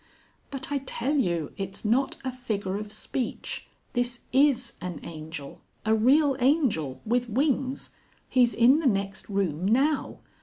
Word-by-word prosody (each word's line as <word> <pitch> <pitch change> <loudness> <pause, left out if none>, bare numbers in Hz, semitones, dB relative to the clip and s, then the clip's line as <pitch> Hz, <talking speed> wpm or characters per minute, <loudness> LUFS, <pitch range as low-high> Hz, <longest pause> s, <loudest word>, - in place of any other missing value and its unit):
"But 275 0 -5
I 285 - +1
tell 265 +1 -2
you 170 - 0
it's 195 +2 -5
not 255 +5 +2
a 260 - 0
figure 215 -6 -3
of 210 0 -6
speech; 245 +2 -4 0.3
this 245 0 -1
is 260 -3 +3
an 180 -3 -5
angel, 155 -3 -8 0.2
a 220 - +3
real 270 +6 +4
angel 245 - +2
with 245 +2 +1
wings. 270 +2 0 0.4
He's 245 -2 +3
in 255 +6 +6
the 320 - +1
next 195 -3 -1
room 185 -5 -1
now. 275 +7 +2
240 Hz, 145 wpm, -27 LUFS, 195-265 Hz, 0.4 s, in